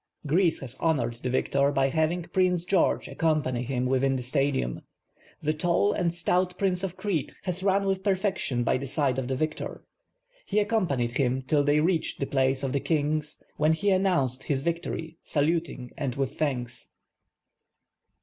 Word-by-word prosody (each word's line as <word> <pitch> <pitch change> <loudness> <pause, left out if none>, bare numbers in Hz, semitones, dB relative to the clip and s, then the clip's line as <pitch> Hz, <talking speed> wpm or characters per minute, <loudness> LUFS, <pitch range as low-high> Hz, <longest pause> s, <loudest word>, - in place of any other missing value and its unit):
Greece 165 +4 +2
has 130 -3 -4
honored 135 -8 +1
the 125 - -2
victor 140 +2 +2
by 135 -1 +2
having 160 +4 0
Prince 180 -1 +1
(Jeorgc 185 -2 +2
accompany 135 -7 0
liim 130 -2 -1
within 135 +1 +2
the 125 - -3
Stadium. 135 - 0 0.6
The 155 +1 +1
tall 175 +6 +2
and 175 -3 0
stout 180 +1 0
Prince 185 -2 0
of 185 -2 -3
Crete 190 -8 -2
has 180 -1 -3
run 195 +1 +2
with 195 -1 0
perfection 190 - 0
by 125 - +1
the 140 - -5
side 135 -2 0
of 125 - -3
the 130 - -1
victor, 155 +3 -3 0.7
lie 210 - +3
accompanied 145 - 0
him 130 0 +1
till 145 +2 +2
ihey 150 +2 +3
reached 170 -2 0
the 135 - 0
place 135 0 +1
of 135 -2 -1
the 140 - +2
Kings, 150 0 -1
when 155 +1 +3
he 200 +5 +1
announced 175 -10 +1
his 135 -2 -1
victory, 165 -1 -3
saluting 150 -4 -1
and 130 -4 -3
with 135 0 -1
thanks. 125 -5 -3
150 Hz, 170 wpm, -27 LUFS, 135-180 Hz, 0.7 s, lie